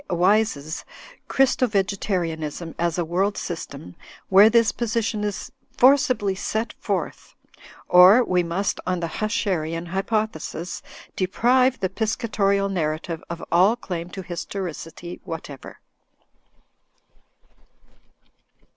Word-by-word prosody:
Wyse's 180 -4 +1 0.4
"Christo 265 -1 +2
Vegetarianism 180 -6 -2
as 170 -1 0
a 175 - 0
World 190 +5 0
System,*' 140 - -6 0.3
where 200 +3 +8
this 230 0 +4
position 225 -2 -1
is 205 -2 -4 0.3
forcibly 255 -6 +4
set 220 +4 -3
forth), - - -4 0.5
or 185 +7 +8
we 180 -5 +1
must, 175 +4 -2
on 180 -1 0
the 170 - -2
Huscherian 175 -6 -1
hypothesis, 190 -3 -3 0.3
deprive 250 +7 +2
the 190 - 0
Piscatorial 200 -2 0
narrative 165 -2 -3
of 170 0 -6
all 185 +7 +5
claim 180 -7 -6
to 190 +1 -7
his 175 -1 -5
toricity 175 -2 -6
whatever. 150 -5 -8
190 Hz, 100 wpm, -23 LUFS, 170-215 Hz, 0.5 s, where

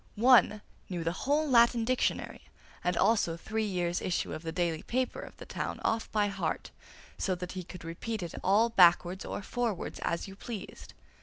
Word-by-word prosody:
One 225 -2 +5 0.3
knew 175 -3 -3
the 165 - 0
whole 290 - 0
Latin 235 -2 +5
dictionary 255 +1 -1 0.4
and 180 0 0
also 190 -7 +2
three 220 +5 -2
years' 175 -3 -1
issue 180 - -1
of - - -5
the 165 -1 -4
daily 165 -2 -1
paper 255 +1 -2
of - - -10
the - - -10
town - - -4
off 225 0 0
by 210 -1 +2
heart, 190 -5 -3 0.5
so 185 - 0
that 180 0 -6
he 185 -1 -5
could 180 0 -10
repeat 185 +6 -4
it 170 - -6
all 210 +5 +4
backwards 180 -2 +4
or - - -5
forwards 230 -4 -3
as 170 - -2
you 195 - -10
pleased. 220 +1 -8
195 Hz, 180 wpm, -30 LUFS, 175-230 Hz, 0.5 s, One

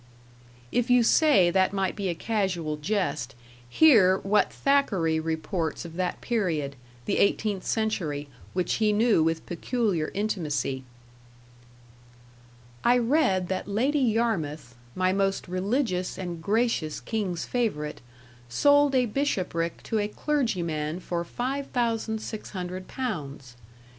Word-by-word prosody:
If 245 0 0
you 245 -1 +5
say 230 - +5
that 190 +1 +2
might 195 -1 -1
be 200 -3 -2
a 170 - -1
casual 180 -7 -1
jest, 150 - -2 0.3
hear 210 - +6
what 200 +2 +2
Thackeray 195 - +1
reports 160 +1 -2
of 165 -1 -9
that 180 0 -2
period, 165 - -1 0.3
the - - 0
eighteenth 200 -1 +1
century, 170 -10 -1 0.3
which 180 -1 0
he 210 -1 +4
knew 220 -4 +3
with 165 0 -1
peculiar 180 -3 -1
intimacy: 150 -10 -1 2.0
I 245 +1 +5
read 240 - +2
that 190 - -2
Lady 255 +9 +1
Yarmouth 200 - 0 0.2
(my 185 0 +2
most 195 0 0
religious 185 +1 -1
and 175 -3 -5
gracious 205 -6 0
King's 200 -7 -3
favorite) 180 -12 -2 0.5
sold 285 - +4
a 250 -1 +4
bishopric 185 - -2
to 220 - -1
a 205 - 0
clergyman 180 - -1
for 175 -1 -3
5600 220 -6 -3
pounds. 145 - -5
190 Hz, 115 wpm, -27 LUFS, 165-230 Hz, 2.0 s, hear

